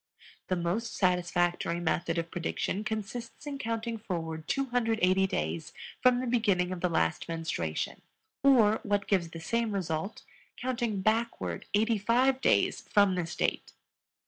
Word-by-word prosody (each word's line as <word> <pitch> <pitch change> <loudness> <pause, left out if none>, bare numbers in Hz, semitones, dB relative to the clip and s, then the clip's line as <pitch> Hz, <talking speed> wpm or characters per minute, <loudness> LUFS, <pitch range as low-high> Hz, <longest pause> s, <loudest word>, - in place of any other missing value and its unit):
The 185 - +1
most 180 +7 -2
satisfactory 175 -2 +1
method 170 0 0
of 165 0 -2
prediction 175 +3 -2
consists 220 +4 -5
in 285 -1 -5
counting 230 0 -3
forward 165 -5 -4
280 225 -8 +2
days 80 - -3 0.3
from 250 -1 +5
the - - -2
beginning 205 -7 +2
of 180 -2 -4
the 180 - +2
last 80 - 0
menstruation 160 - -3 0.4
or, 230 -6 +5
what 205 -1 0
gives 185 -5 +1
the 165 - -8
same 230 +6 -1
result, 180 0 -3 0.3
counting 240 -5 -1
backward 225 +3 -1
eighty 220 +1 +2
five 255 +5 +3
days - - +3
from 200 -3 +5
this 175 -2 -3
date. - - -1
200 Hz, 140 wpm, -30 LUFS, 170-230 Hz, 0.4 s, from